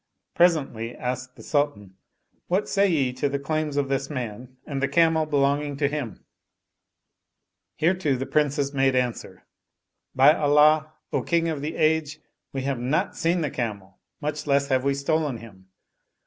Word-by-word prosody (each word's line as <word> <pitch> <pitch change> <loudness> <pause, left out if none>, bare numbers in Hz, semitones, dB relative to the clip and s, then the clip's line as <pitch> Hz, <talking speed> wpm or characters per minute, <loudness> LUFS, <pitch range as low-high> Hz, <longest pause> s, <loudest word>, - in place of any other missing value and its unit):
Presently, 140 -10 +1
asked 125 +1 -4
the - - -13
Sultan, 145 -10 -1 0.3
" - - -45
What 190 +4 0
say 200 0 +2
ye 135 -7 +1
to 135 +3 -1
the 140 - -1
claims 150 +1 -2
of 140 -1 +1
this 135 0 -2
man 125 -2 -6
and 140 -2 -4
the 140 - +2
camel 160 -1 +3
belonging 145 0 +1
to 140 -1 +2
him?" 145 -5 -5 1.5
Hereto 165 -3 +1
the 130 +1 -3
Princes 145 -1 0
made 135 -1 +2
answer, 125 -2 -2 0.3
" - - -58 0.3
By 135 +3 +7
Allah, 150 0 +4 0.2
O - - +1
King 165 -1 +1
of 155 -3 -3
the 155 +3 -4
Age, 155 -1 +1 0.3
we 135 -1 -4
have 135 -2 -2
not 150 +10 -1
seen 170 +1 +1
the 150 -4 -2
camel, 100 -5 -5 0.2
much 150 0 -4
less 140 0 +2
have 130 -1 +2
we 140 0 +1
stolen 145 -1 0
him." 95 -5 -14
140 Hz, 165 wpm, -25 LUFS, 130-155 Hz, 1.5 s, By